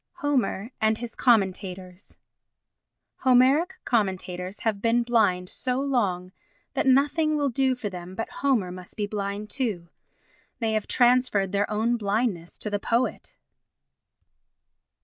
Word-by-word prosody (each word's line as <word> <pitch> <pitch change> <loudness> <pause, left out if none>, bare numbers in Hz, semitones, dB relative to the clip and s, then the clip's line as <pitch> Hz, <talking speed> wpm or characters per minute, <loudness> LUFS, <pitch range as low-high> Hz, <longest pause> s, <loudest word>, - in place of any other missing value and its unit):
Homer 255 -6 -1
and 220 0 +2
his 235 -1 -7
Commentators 190 -5 0 1.0
Homeric 265 +8 +4
commentators 185 -3 -2
have 215 -3 -1
been 235 +1 +2
blind 210 -7 +2
so 250 +6 -2
long 200 -10 -1 0.4
that - - 0
nothing 295 +4 +3
will 285 -2 0
do 260 +1 +1
for 240 -4 -5
them 180 -1 -8
but 225 - -3
Homer 240 -10 +1
must 180 0 -10
be 210 - 0
blind 205 0 -4
too. 210 -11 -3 0.7
They 225 -2 -1
have 215 -1 -1
transferred 245 -6 +3
their 200 0 0
own 225 +3 +1
blindness 200 -5 -1
to 210 - -5
the 205 - 0
poet. 235 +4 -1
220 Hz, 130 wpm, -26 LUFS, 190-250 Hz, 1.0 s, Homeric